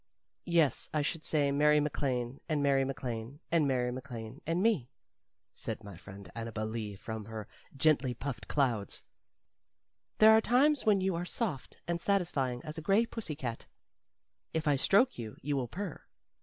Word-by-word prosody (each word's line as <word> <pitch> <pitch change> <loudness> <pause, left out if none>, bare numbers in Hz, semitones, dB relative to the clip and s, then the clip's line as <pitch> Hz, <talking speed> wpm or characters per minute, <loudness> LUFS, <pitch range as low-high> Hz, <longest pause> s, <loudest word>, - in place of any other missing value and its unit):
"Yes, 165 -6 +2
I 150 -1 +1
should 160 +2 -2
say 145 -3 +1
Mary 150 +1 +5
MacLane, 135 -4 -1
and 150 -2 +1
Mary 135 -1 +4
MacLane, 125 -1 -4
and 165 -4 +4
Mary 125 -2 +1
MacLane, 125 0 -7
and 170 +3 +1
me," 205 - +2 0.6
said 110 - -5
my 100 -1 -9
friend 100 -1 -11
Annabel 115 -1 -4
Lee 110 -2 -4
from 110 +2 -6
her 110 -1 -6 0.3
gently 135 -4 +3
puffed 115 -5 -5
clouds. 120 -9 0 1.1
"There 215 0 +8
are 220 - +5
times 265 +3 +3
when 200 -3 +5
you 190 0 +1
are 170 +1 -2
soft 180 - -3
and 170 0 -1
satisfying 150 -11 0
as 155 +1 -5
a - - -7
gray 195 +7 +3
pussy 220 -10 -5
cat. 125 -6 -5 0.9
If 160 -1 0
I 145 - +5
stroke 205 - +4
you, 110 -2 -6
you 145 +1 0
will 130 -3 -1
purr. 185 - -5
140 Hz, 165 wpm, -32 LUFS, 120-170 Hz, 1.1 s, There